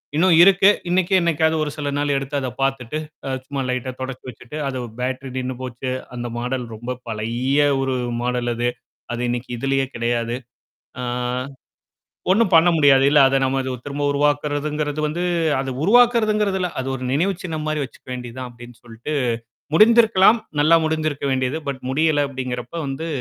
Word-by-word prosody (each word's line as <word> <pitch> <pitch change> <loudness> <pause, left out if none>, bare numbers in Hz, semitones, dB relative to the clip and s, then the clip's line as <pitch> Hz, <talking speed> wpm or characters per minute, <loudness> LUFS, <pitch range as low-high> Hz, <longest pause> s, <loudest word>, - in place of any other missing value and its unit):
இன்னும் 170 +1 +4
இருக்கு. 195 +1 +6 0.2
இன்னைக்கும் 185 +1 +3
என்ன்னைக்காவது 160 -2 +2
ஒரு 150 - -2
சில 145 -1 -2
நாள் 145 -1 +1
எடுத்து 135 +1 -4
அத 130 - -3
பாத்துட்டு, 135 0 -1 0.3
அ - - -2 0.2
சும்மா 140 -1 -3
லைட்டா 125 0 -2
தொ 125 - -16
தொடச்சு 130 0 -6
வச்சுட்டு 125 +4 -11
அத 130 -2 -3 0.2
பேட்டரி 130 +1 -3
நின்னு 130 0 -2
போச்சு. 130 0 -4 0.2
அந்த 120 0 -4
மாடல் 125 +1 -2
ரொம்ப 120 +3 -6 0.2
பழைய 120 +6 -1 0.2
ஒரு 135 -1 0 0.3
மாடல் 125 0 -1
அது. 120 +1 0 0.5
அது 120 - -3
இன்னைக்கு 120 +1 -3
இதுலயே 135 0 +1
கெடையாது. 120 0 -1 0.6
ஆ - - -3 1.3
ஒண்ணும் 205 -1 +3
பண்ண 165 +1 +7
முடியாது. 140 -3 +5
இல்ல. 150 - +5
அத 135 - +1
நம்ம 135 +1 +1
இது 130 - -3 0.2
திரும்ப 145 +1 -3
உருவாக்குறதுங்கிறது 145 +1 0
வந்து 170 +4 -3 0.4
அத 135 -1 -2
உருவாக்குறதுங்கதல்ல! 215 -3 +3
அது 130 - -6
ஒரு 130 - -6
நினைவு 175 +9 +1
சின்னம் 160 -3 -4
மாரி 155 -1 -1
வச்சுக்க 135 - -12
வேண்டியதுதான் 125 0 -6
அப்டின்னு 120 0 -13
சொல்ட்டு 120 +5 -7 0.6
முடிந்திருக்கலாம்! 225 0 +6 0.2
நல்லா 160 +3 +6
முடிந்திருக்க 155 -3 -1
வேண்டியது! 130 +3 0
பட் 130 -2 -5
முடியல! 145 +1 +2
அப்படிங்கிறப்ப 125 0 -5
வந்து 135 +5 -4
135 Hz, 160 wpm, -21 LUFS, 125-160 Hz, 1.3 s, பண்ண